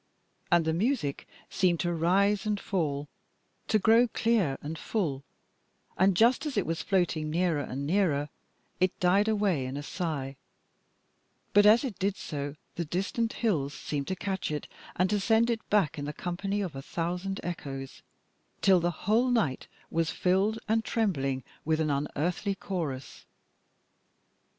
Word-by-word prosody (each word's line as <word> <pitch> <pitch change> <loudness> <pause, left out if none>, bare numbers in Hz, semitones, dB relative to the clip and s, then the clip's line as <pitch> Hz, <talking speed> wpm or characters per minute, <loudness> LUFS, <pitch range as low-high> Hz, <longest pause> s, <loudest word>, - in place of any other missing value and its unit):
And 170 -2 +4
the 160 - +1
music 175 - -1 0.2
seemed 175 -3 +1
to 175 -1 0
rise 195 +5 +2
and 210 -1 0
fall, 150 -8 -2 0.6
to 215 - +3
grow 225 +4 +5
clear 220 -12 +1
and 155 +3 -5
full, 155 -6 -2 0.7
and 190 -1 +3
just 240 - +4
as 280 - -4
it 200 - +2
was 165 0 -2
floating 170 -5 0
nearer 165 -2 +1
and 140 0 -4
nearer, 150 -4 +1 0.5
it 185 0 +1
died 195 +4 +3
away 205 -9 +1
in 130 +2 -4
a 145 - -5
sigh: 145 -6 -3 1.2
but 205 0 +7
as 220 +5 +6
it 245 -8 -4
did 195 +1 0
so 145 -1 -5 0.2
the 170 - 0
distant 195 +8 -1
hills 150 - 0
seemed 140 0 -4
to 190 - -1
catch 190 0 -3
it 150 -1 -3 0.3
and 185 - +2
to 210 - +2
send 225 +4 +3
it 230 -1 -4
back 165 -7 +2
in 145 - -4
the 150 - -4
company 195 +5 -2
of 180 -7 -4
a 135 - -5
thousand 180 +6 -3
echoes, 135 -6 -6 0.6
till 190 -2 +6
the 175 0 -3
whole 230 +5 +3
night 220 - 0 0.2
was 165 -1 +1
filled 195 +4 +1
and 220 +1 +2
trembling 140 - 0 0.2
with 160 0 +1
an 155 -2 +1
unearthly 170 +8 -1
chorus. 160 -10 -5
180 Hz, 155 wpm, -29 LUFS, 150-205 Hz, 1.2 s, but